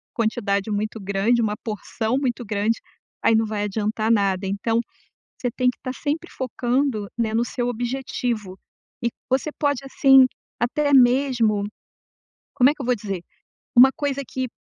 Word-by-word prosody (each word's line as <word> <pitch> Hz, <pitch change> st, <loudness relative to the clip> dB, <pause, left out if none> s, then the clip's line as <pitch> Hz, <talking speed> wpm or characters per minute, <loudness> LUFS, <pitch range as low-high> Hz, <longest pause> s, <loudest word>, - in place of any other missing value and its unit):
quantidade 215 Hz, -3 st, 0 dB
muito 215 Hz, +2 st, -2 dB
grande, 200 Hz, +5 st, +1 dB
uma 210 Hz, -2 st, 0 dB
porção 220 Hz, +2 st, -2 dB
muito 250 Hz, -3 st, -2 dB
grande, 210 Hz, +2 st, 0 dB, 0.4 s
aí 225 Hz, -, +5 dB
não 225 Hz, 0 st, +3 dB
vai 210 Hz, -1 st, -2 dB
adiantar 215 Hz, +2 st, -1 dB
nada, 195 Hz, -3 st, +2 dB
então 215 Hz, +4 st, 0 dB, 0.6 s
você 250 Hz, -, 0 dB
tem 250 Hz, +1 st, +1 dB
que 250 Hz, -, -16 dB
tá 255 Hz, -, -3 dB
sempre 310 Hz, +5 st, -3 dB
focando, 250 Hz, -3 st, -1 dB
né, 220 Hz, -2 st, 0 dB
no 230 Hz, +1 st, +2 dB
seu 245 Hz, 0 st, -2 dB
objetivo, 240 Hz, -4 st, -3 dB, 0.4 s
e 235 Hz, -, +2 dB, 0.2 s
você 265 Hz, +4 st, +1 dB
pode, 285 Hz, -2 st, 0 dB
assim, 270 Hz, -1 st, +6 dB, 0.3 s
até 285 Hz, +4 st, +1 dB
mesmo, 245 Hz, -5 st, +4 dB, 0.9 s
como 260 Hz, -1 st, +5 dB
é -, -, +1 dB
que 295 Hz, -, -9 dB
eu -, -, -4 dB
vou 250 Hz, 0 st, +2 dB
dizer, 195 Hz, -4 st, -5 dB, 0.6 s
uma 260 Hz, +2 st, +10 dB
coisa 280 Hz, -2 st, -2 dB
que 260 Hz, -1 st, -3 dB
235 Hz, 155 wpm, -23 LUFS, 215-260 Hz, 0.9 s, uma